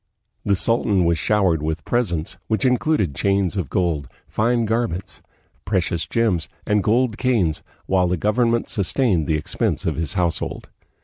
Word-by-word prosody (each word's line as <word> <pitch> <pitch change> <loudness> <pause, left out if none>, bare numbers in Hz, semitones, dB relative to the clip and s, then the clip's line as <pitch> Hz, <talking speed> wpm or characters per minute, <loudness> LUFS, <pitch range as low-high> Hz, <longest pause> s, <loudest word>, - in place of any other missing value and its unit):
The 100 - +2
sultan 100 -3 +2
was 85 -1 +2
showered 95 -7 +2
with 80 +1 -3
presents, 90 -7 -1
which 110 +5 0
included 125 - +1
chains 100 +3 +1
of 90 -9 -2
gold, 80 -7 0 0.2
fine 115 +1 +1
garments, 110 -5 -2 0.4
precious 90 -4 -1
gems, 95 -9 0 0.2
and 105 0 +2
gold 115 +2 +1
canes, 110 -12 +1 0.2
while 95 -1 +2
the 90 0 0
government 115 +5 +1
sustained 100 - +1
the 80 - +2
expense 75 - -2
of 80 -4 -1
his 80 -1 -2
household. 85 -3 -2
95 Hz, 145 wpm, -22 LUFS, 85-115 Hz, 0.4 s, The